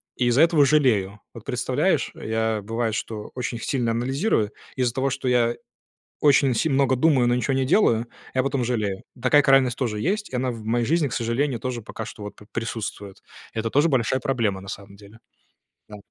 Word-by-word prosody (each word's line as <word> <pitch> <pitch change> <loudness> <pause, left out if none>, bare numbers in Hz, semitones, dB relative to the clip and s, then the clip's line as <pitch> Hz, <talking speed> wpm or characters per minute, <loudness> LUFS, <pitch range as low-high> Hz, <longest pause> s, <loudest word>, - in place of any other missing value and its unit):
и 125 - 0
из-за 125 +6 +5
этого 165 -4 +4
жалею. 110 -9 +2
Вот - - -11
представляешь, - - 0
я, 110 -1 -1
бывает, 115 +1 -2
что 110 -2 -5
очень 120 -2 -3
сильно 120 -1 -1
анализирую, 125 - 0 0.3
и - - -1
из-за 120 -2 +1
того, 135 +2 0
что 135 0 -4
я 120 -1 +2 0.7
очень 140 -3 +4
си 140 - +1
много 135 -2 +2
думаю, 130 -2 +3
но 120 - +3
ничего 125 +2 0
не 135 0 +1
делаю, 125 - +3 0.3
я 130 0 +1
потом 135 -1 -1
жалею. 105 -5 -2 0.2
Такая 130 +4 +5
крайность 135 -3 +4
тоже 115 -5 -2
есть, 210 - -1
и 130 - -3
она 125 0 -1
в 115 -2 -9
моей 115 +2 0
жизни, 155 +3 +1
к - - -9
сожалению, 120 +3 -1
тоже 125 -1 -4
пока 110 +1 -7
что 105 - -10
вот 105 - -8
п 105 - -16
присутствует. 110 -3 -5 0.4
Это 115 0 -2
тоже 145 +7 +3
большая 130 -2 +1
проблема, 115 -9 -1
на 95 - -12
самом 100 0 -8
деле. 100 +2 -16 0.7
Да. 105 - -9
120 Hz, 195 wpm, -24 LUFS, 110-135 Hz, 0.7 s, из-за